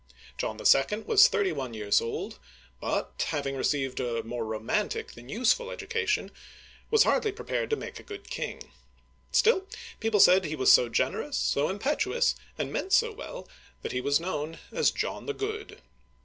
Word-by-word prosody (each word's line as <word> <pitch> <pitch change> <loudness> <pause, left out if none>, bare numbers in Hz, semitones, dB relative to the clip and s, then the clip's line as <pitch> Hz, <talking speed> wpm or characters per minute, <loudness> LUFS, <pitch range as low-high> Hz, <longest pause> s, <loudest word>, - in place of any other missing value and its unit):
John - - -3
11. 210 +11 +3
was 440 +1 +7
thirty 410 -6 0
one 125 -3 -5
years 105 -1 +2
old, 115 - -5 0.4
but, - - -2
hav 145 - -2
ing 135 0 -2
received 135 -1 -1
a 120 -3 -2
more 120 +1 -4
romantic 110 0 -2
than 120 +1 -14
useful 255 - +1
education, 460 -1 -2 0.6
was 445 - +6
hardly 430 - +2
prepared 405 - -3
to 440 - +2
make - - -8
a - - -16
good 410 -1 -8
king. - - -6 0.6
Still, 390 -4 +3 0.3
people 225 -2 +1
said 185 0 +7
he 155 0 -3
was 130 - +6
so 120 - +5
generous, 130 - -1
so 145 +2 +1
impetuous, 345 - +1 0.2
and - - -3
meant 385 - -2
so 465 0 +4
well, - - -9 0.4
that - - -3
he 125 - -2
was 140 +3 +2
known 165 -2 -4
as 480 -1 +3
John - - -4
the 435 - -2
Good. 425 +1 -5
210 Hz, 170 wpm, -28 LUFS, -, 0.6 s, was